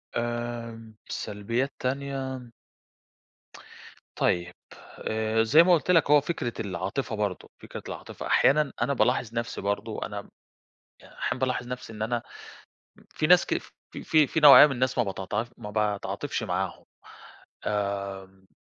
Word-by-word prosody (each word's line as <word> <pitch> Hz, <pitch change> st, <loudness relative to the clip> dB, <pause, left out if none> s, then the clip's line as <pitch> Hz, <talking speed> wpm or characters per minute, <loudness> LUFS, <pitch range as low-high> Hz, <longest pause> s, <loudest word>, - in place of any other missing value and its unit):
آمم 120 Hz, -1 st, -4 dB
سلبيات 115 Hz, +7 st, -2 dB
تانية. 130 Hz, -1 st, -3 dB, 1.7 s
طيب، 90 Hz, 0 st, 0 dB, 0.6 s
آآ 110 Hz, 0 st, +1 dB
زي 150 Hz, +9 st, +6 dB
ما 180 Hz, +1 st, +5 dB
قُلت 170 Hz, +2 st, +2 dB
لك، 165 Hz, -4 st, +4 dB
هو 150 Hz, -1 st, +7 dB
فكرة 140 Hz, -6 st, -3 dB
العاطفة 100 Hz, +6 st, -3 dB
برضو، 105 Hz, -3 st, -3 dB
فكرة -, -, -9 dB
العاطفة -, -, -7 dB
أحيانًا 150 Hz, +1 st, +3 dB
أنا 140 Hz, -, +1 dB
بالاحظ 120 Hz, -1 st, +1 dB
نفسي 115 Hz, 0 st, -3 dB
برضو، 100 Hz, +2 st, -2 dB
أنا 100 Hz, -1 st, -6 dB, 0.8 s
أحيانًا -, -, -4 dB
بالاحظ 125 Hz, -2 st, -1 dB
نفسي 125 Hz, -2 st, -6 dB
إن 105 Hz, 0 st, -6 dB
أنا 115 Hz, +1 st, -1 dB, 0.7 s
م -, -, -21 dB
في 155 Hz, -, +1 dB
ناس 180 Hz, +1 st, +6 dB
ك -, -, 0 dB
في -, -, -12 dB
في 155 Hz, -2 st, +4 dB
في 160 Hz, -, -1 dB
نوعية 145 Hz, -1 st, +10 dB
من 150 Hz, -, -1 dB
الناس 130 Hz, 0 st, -1 dB
ما 120 Hz, -, +4 dB
باتعا 100 Hz, +2 st, -3 dB
ما 105 Hz, -3 st, -8 dB
باتعاطفش 105 Hz, -1 st, -2 dB
معاهم. -, -, -3 dB, 1.2 s
آمم 95 Hz, -1 st, -10 dB
120 Hz, 135 wpm, -27 LUFS, 105-135 Hz, 1.7 s, نوعية